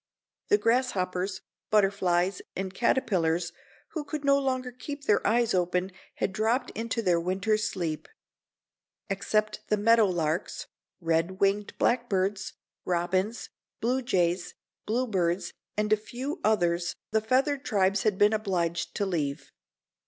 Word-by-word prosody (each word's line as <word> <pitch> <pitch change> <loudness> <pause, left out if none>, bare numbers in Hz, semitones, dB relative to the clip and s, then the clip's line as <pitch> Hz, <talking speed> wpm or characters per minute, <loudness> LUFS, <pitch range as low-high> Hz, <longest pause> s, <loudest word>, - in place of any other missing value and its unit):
The 415 - +5
grasshoppers, 195 - 0 0.3
butterflies 195 -3 +2
and 190 0 -3
caterpillars 175 -8 +1 0.4
who 315 - -4
could 295 0 -5
no 280 0 +5
longer 255 -2 -1
keep 285 +3 -7
their 205 -6 +3
eyes 235 0 +3
open 180 +1 +1 0.2
had 190 - -1
dropped 230 +5 +1
into 230 +1 -2
their 175 -3 +3
winter's 195 +5 0
sleep. 165 -5 -3 1.0
Except 215 +2 0
the 210 - +2
meadow 225 +1 +5
larks, 170 0 -1 0.3
red 165 +2 0
winged 200 +1 +1
blackbirds, 200 -5 0 0.3
robins, 185 +5 -1 0.3
blue 250 +3 +1
jays, 180 -6 0 0.3
bluebirds 195 -7 0 0.2
and 210 0 +2
a - - +4
few 255 - -5
others 175 -5 +1 0.2
the 220 - +2
feathered 270 +5 +1
tribes 195 -2 +2
had 210 -3 +1
been 205 +2 +5
obliged 175 -6 -1
to 200 - 0
leave. 150 -7 -2
200 Hz, 125 wpm, -28 LUFS, 180-230 Hz, 1.0 s, The